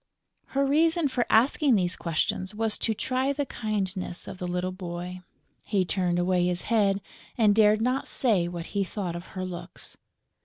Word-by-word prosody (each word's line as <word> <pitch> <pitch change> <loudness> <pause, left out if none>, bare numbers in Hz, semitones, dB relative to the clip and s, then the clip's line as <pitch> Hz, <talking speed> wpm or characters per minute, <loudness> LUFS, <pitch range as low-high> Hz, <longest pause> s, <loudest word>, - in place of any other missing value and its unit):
Her 275 0 +3
reason 320 +2 +3
for 245 -2 0
asking 260 +3 +4
these 180 -3 +1
questions 180 +4 -1
was 220 0 0
to 220 - 0
try 260 +5 0
the 285 0 -1
kindness 195 -7 -3
of 185 - -8
the 180 - -3
little 180 +1 -1
boy. 180 0 -6 0.4
He 195 -4 0
turned 180 -1 0
away 180 0 +2
his 180 -1 -1
head 200 -4 +2 0.4
and 215 -3 +5
dared 215 0 +4
not 255 +3 0
say 205 -9 +1
what 170 -1 -5
he 200 -1 +1
thought 185 -2 -4
of 175 +1 -6
her 185 - -2
looks. 175 0 -8
195 Hz, 170 wpm, -27 LUFS, 180-230 Hz, 0.4 s, and